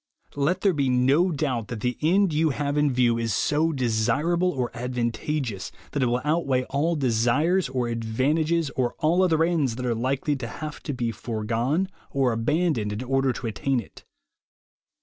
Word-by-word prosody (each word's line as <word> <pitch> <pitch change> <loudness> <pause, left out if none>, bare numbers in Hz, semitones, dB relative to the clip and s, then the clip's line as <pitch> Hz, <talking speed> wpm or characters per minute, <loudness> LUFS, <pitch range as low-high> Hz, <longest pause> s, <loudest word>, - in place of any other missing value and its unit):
Let 160 +7 0
there 195 -3 +3
be 140 -4 +1
no 135 +8 +3
doubt 135 - -2
that 110 -1 -6
the 125 +1 -1
end 180 +3 +3
you 155 +1 +2
have 145 +1 -2
in 150 -1 +2
view 120 -2 +2
is 115 -4 -1
so 155 +2 +1
desirable 135 +8 +1
or 130 -7 -2
advantageous 120 - -3 0.2
that 145 - -1
it 125 - +3
will 125 +1 0
outweigh 145 -4 +1
all 155 +5 +1
desires 135 +7 +2
or 125 -2 -1
advantages 140 +8 0
or 125 -2 -1
all 170 +4 +2
other 165 -3 +3
ends 155 -8 +1
that 125 +1 -4
are 120 - +1
likely 135 +5 -1
to 120 -3 -5
have 155 +4 -7
to 145 - -2
be 120 -2 -1
fore 110 -1 -5
gone 125 - 0 0.2
or 135 -3 +1
abandoned 115 -1 0
in 105 +4 -4
order 135 +1 +1
to 125 - -6
attain 125 +4 0
it. - - -11
135 Hz, 180 wpm, -25 LUFS, 120-155 Hz, 0.2 s, there